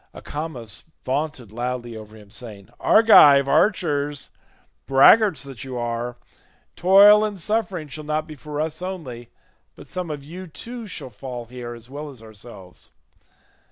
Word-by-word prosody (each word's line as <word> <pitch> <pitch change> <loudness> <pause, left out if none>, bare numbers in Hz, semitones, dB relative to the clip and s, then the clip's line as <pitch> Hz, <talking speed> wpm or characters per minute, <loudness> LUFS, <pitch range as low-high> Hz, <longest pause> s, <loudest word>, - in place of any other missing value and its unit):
Acamas 130 -9 -7 0.2
vaunted 135 -5 -3
loudly 120 0 -4
over 110 0 -11
him 105 -2 -17
saying, 105 -5 -9
"Argive 145 -11 +7
archers, 145 -3 0 0.6
braggarts 170 +6 +5
that 135 -6 -9
you 130 -2 -6
are, 120 +1 -3 0.6
toil 200 +3 +7
and 210 -3 -3
suffering 200 -5 -2
shall 150 +2 -8
not 155 +1 -2
be 155 - -10
for 150 0 -7
us 155 +1 -3
only, 145 -11 -7 0.5
but - - -13
some 180 -2 -5
of 145 -2 -6
you 180 +5 -9
too 230 +9 -8
shall 145 -9 -8
fall 125 -2 -7
here 120 0 -8
as 115 0 -13
well 145 +3 -7
as 125 -5 -13
ourselves. 105 -4 -13
140 Hz, 145 wpm, -22 LUFS, 120-165 Hz, 0.6 s, Argive